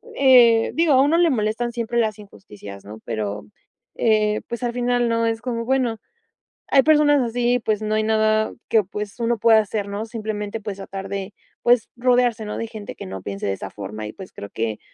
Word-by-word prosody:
eh, 240 -4 +6
digo, 330 -2 +3
a 260 - +6
uno 295 +4 +3
le 345 -1 +4
molestan 230 0 -1
siempre 235 0 -3
las 215 -2 0
injusticias, 100 - -12
¿no?, 105 +2 -10
pero, 105 -2 -4 0.5
eh, 215 -1 +2
pues 235 +1 -5
al 240 - 0
final 245 -1 +1
no 230 0 +1
es 225 0 -1
como 235 -2 -3
bueno, 250 -4 0 0.7
hay 270 -2 +5
personas 295 -2 +4
así, 245 +1 +1
pues, 215 -2 -1
no 215 0 -1
hay 215 - +1
nada 215 0 +2 0.2
que, 220 -2 +4
pues, 210 +3 -7
uno 235 0 +1
pueda 225 0 +5
hacer, 205 -1 -2
¿no?, 205 +2 -4
simplemente, 215 -2 -4
pues, 200 -2 -5
tratar 195 0 -7
de, 200 0 -5 0.3
pues, 240 -1 +3
rodearse, 245 -2 +2
¿no?, 210 - -5
de 230 - -3
gente 215 -2 -8
que - - -8
no 95 0 -7
piense 100 0 -5
de 100 - 0
esa 95 - -6
forma 105 +2 -7
y, 105 - -7
pues, 190 - -11
creo 100 - -8
que, 110 -1 -3
220 Hz, 205 wpm, -22 LUFS, 200-240 Hz, 0.7 s, eh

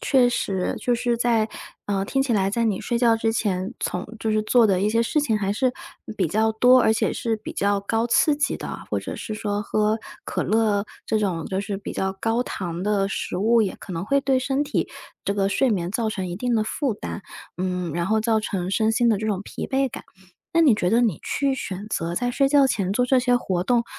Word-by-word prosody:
确 255 -3 +4
实， 190 -6 -1
就 245 -1 +1
是 240 0 0
在 230 -2 +2 0.4
呃， 195 -1 0
听 270 +7 0
起 270 -3 +1
来 195 -3 +2
在 230 +3 0
你 210 -4 0
睡 235 - -1
觉 235 -2 +4
之 225 0 0
前， 195 -2 -1
从 180 - -2
就 220 -1 -1
是 215 0 +2
做 235 +2 +4
的 190 -3 +2
一 210 +1 +2
些 230 - +2
事 265 +7 +1
情 225 -7 +1
还 200 -1 0
是 255 +3 +1 0.4
比 185 - +1
较 220 +7 +2
多， 250 +3 +5
而 220 - +4
且 220 - 0
是 225 -1 -1
比 215 - -8
较 200 0 +1
高 225 +3 -1
刺 295 +5 +4
激 285 0 0
的， - - -6
或 - - +1
者 - - -6
是 - - -6
说 205 -1 -2
喝 215 +1 +1 0.3
可 - - -2
乐 215 -2 +1 0.2
这 215 -1 +1
种 180 -6 -1
就 190 0 -2
是 200 0 -4
比 195 - -6
较 190 0 -1
高 230 +2 +1
糖 175 -7 -5
的 200 -1 +1
食 195 - -3
物， 225 +4 +3
也 195 - -2
可 190 - -9
能 165 +1 -3
会 280 +6 +2
对 270 -2 +2
身 270 +2 0
体 - - -1 0.4
这 - - 0
个 195 -1 +1
睡 255 +6 +2
眠 175 -5 0
造 225 0 0
成 190 -3 -3
一 175 - -4
定 245 +5 -2
的 215 - +1
负 270 +3 -1
担。 205 0 -6 0.4
嗯， 180 -2 -2
然 170 +2 -1
后 220 +2 +2
造 220 0 +2
成 185 -3 -3
身 220 +1 +2
心 235 +1 +2
的 215 -3 +3
这 215 - -4
种 195 -3 -1
疲 - - -6
惫 270 0 +1
感。 - - -8 0.5
那 335 - +4
你 285 -9 +6
觉 180 -3 0
得 230 - +4
你 225 -9 +1
去 275 -1 0
选 200 -5 -5
择 170 -5 -2
在 245 - 0
睡 275 +2 +3
觉 280 -1 +5
前 195 -7 -1
做 250 +4 +1
这 260 0 +4
些 245 0 +3
活 185 -7 -1
动， 235 +2 +2
220 Hz, 260 characters per minute, -23 LUFS, 195-245 Hz, 0.5 s, 你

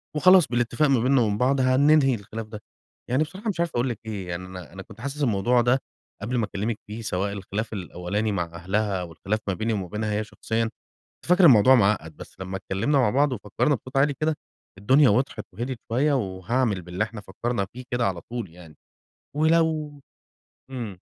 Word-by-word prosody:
وخلاص 185 0 +6
بالإتفاق 120 +5 +1
ما 130 -4 +4
بيننا 130 +1 +3
وبين 105 -2 +1
بعض 130 +3 +2
هننهي 135 +1 +4
الخلاف 110 +1 -7
ده. 105 -1 -9 0.5
يعني 130 +5 +2
بصراحة 190 +8 -6
مش 175 -4 -3
عارف 170 - +1
أقُول 120 +2 +1
لِك 115 - -4
إيه 100 -4 -5
يعني 85 +1 -5
أنا 90 -1 -10
أنا 95 - -8
كنت 110 - -14
حاسس 140 +2 -3
الموضوع 120 +2 +3
ده، 125 +3 +3 0.4
قبل 120 +4 -2
ما 115 - +1
أكلمِك 105 +2 -3
فيه 110 +2 -6
سواء 100 -1 -2
الخلاف 105 +3 -4
الأولاني 100 +3 -3
مع 90 -3 0
أهلها 95 +3 -2
والخلاف 90 +5 -3
ما 95 - +1
بيني 110 +5 -1
وما 95 -3 -3
بينها 105 +2 -3
هي 105 +1 0
شخصيًا، 110 +1 -2
كنت 110 - -10 0.4
فاكر 180 0 +6
الموضوع 130 -1 +7
معقّد 100 - +1
بس - - -11
لمّا 95 0 -4
اتكلّمنا 100 +10 0
مع 125 -5 +3
بعض 140 +4 +2
وفكّرنا 120 +6 0
بصوت 130 +3 -7
عالي 145 +1 +3
كده، 155 0 +1 0.4
الدنيا 130 +7 +5
وضحت 115 0 0
وهديِت 120 +3 -4
شوية، 140 +5 +2
وهاعمِل 100 0 -1
باللي 90 +4 -2
إحنا 110 -1 -7
فكّرنا 100 +2 -3
فيه 125 - -8
كده 120 -1 +1
على 90 -3 -3
طول 120 -2 -6
يعني، 85 -3 -14 0.6
ولو 155 -2 +1 0.7
إمم. 115 -8 -6
115 Hz, 190 wpm, -25 LUFS, 100-135 Hz, 0.7 s, الموضوع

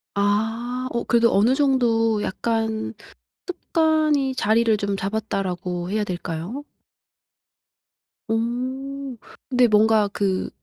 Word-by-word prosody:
아. 215 +4 0 0.2
어 235 - -1
그래도 235 -1 +3
어느 215 +6 +4
정도 235 -6 +2
약간 220 - -2 0.5
'습관이 310 -6 +1
자리를 225 -1 +2
좀 200 -1 -2
잡았다.'라고 190 -4 -3
해야 210 +2 0
될까요? 180 - -5 1.6
오. 255 +4 -3 0.3
근데 250 -2 +4
뭔가 215 -1 +4
그 195 -2 -1
225 Hz, 190 characters per minute, -23 LUFS, 205-255 Hz, 1.6 s, 어느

